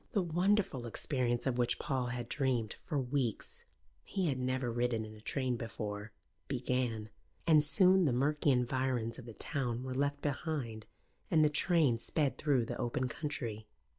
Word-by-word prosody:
The 200 Hz, -5 st, +2 dB
wonderful 175 Hz, -, +1 dB
experience 120 Hz, 0 st, 0 dB
of 125 Hz, -2 st, 0 dB
which 120 Hz, 0 st, +2 dB
Paul 130 Hz, -3 st, -1 dB
had 120 Hz, -1 st, -4 dB
dreamed 125 Hz, -5 st, 0 dB
for 155 Hz, -, -3 dB
weeks 125 Hz, -3 st, -1 dB, 0.4 s
he 185 Hz, -4 st, -1 dB
had 130 Hz, -2 st, -1 dB
never 130 Hz, -1 st, -1 dB
ridden 120 Hz, -1 st, 0 dB
in 110 Hz, -, -10 dB
a 105 Hz, -, -13 dB
train 130 Hz, +1 st, -1 dB
before 105 Hz, -2 st, -5 dB, 0.4 s
began; 125 Hz, -4 st, -1 dB, 0.4 s
and 155 Hz, -3 st, +6 dB
soon 185 Hz, +5 st, +6 dB
the 140 Hz, -, +3 dB
murky 145 Hz, +4 st, +2 dB
environs 125 Hz, -2 st, 0 dB
of 125 Hz, -, -10 dB
the 115 Hz, -, -8 dB
town 125 Hz, -3 st, -1 dB
were 130 Hz, 0 st, -4 dB
left 140 Hz, +2 st, 0 dB
behind 140 Hz, -7 st, -3 dB, 0.4 s
and 155 Hz, -1 st, +5 dB
the -, -, +4 dB
train 150 Hz, -6 st, +3 dB
sped 140 Hz, 0 st, -1 dB
through 135 Hz, -6 st, +2 dB
the -, -, -5 dB
open 125 Hz, +2 st, -1 dB
country. 115 Hz, -7 st, -4 dB
130 Hz, 165 wpm, -33 LUFS, 120-145 Hz, 0.4 s, and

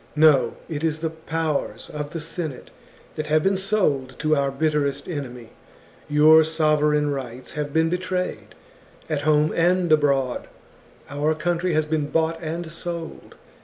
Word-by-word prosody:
No; 145 Hz, -6 st, +4 dB
it 155 Hz, -2 st, -4 dB
is 155 Hz, -1 st, -1 dB
the 160 Hz, -1 st, -1 dB
powers 160 Hz, -1 st, -3 dB
of 150 Hz, -1 st, -5 dB
the 165 Hz, +1 st, -5 dB
Senate 160 Hz, -3 st, -5 dB, 0.4 s
that 155 Hz, -1 st, -4 dB
have 155 Hz, 0 st, +2 dB
been 195 Hz, 0 st, +2 dB
sold 185 Hz, -10 st, 0 dB
to 155 Hz, 0 st, +2 dB
our 140 Hz, -1 st, +1 dB
bitterest 145 Hz, 0 st, -1 dB
enemy; 125 Hz, -8 st, -6 dB, 0.6 s
your 155 Hz, +2 st, +7 dB
sovereign 150 Hz, -2 st, +2 dB
rights 130 Hz, -2 st, -6 dB
have 150 Hz, -1 st, -4 dB
been 160 Hz, +2 st, +2 dB
betrayed, 180 Hz, +1 st, -3 dB, 0.6 s
at 150 Hz, -2 st, 0 dB
home 150 Hz, 0 st, +3 dB
and 175 Hz, 0 st, +2 dB
abroad; 140 Hz, -4 st, +2 dB, 0.6 s
our 150 Hz, +2 st, 0 dB
country 175 Hz, +2 st, -1 dB
has 155 Hz, 0 st, +2 dB
been 155 Hz, -1 st, -1 dB
bought 165 Hz, +1 st, 0 dB
and 165 Hz, +1 st, -4 dB
sold. 170 Hz, -1 st, -7 dB
155 Hz, 145 wpm, -23 LUFS, 145-165 Hz, 0.6 s, your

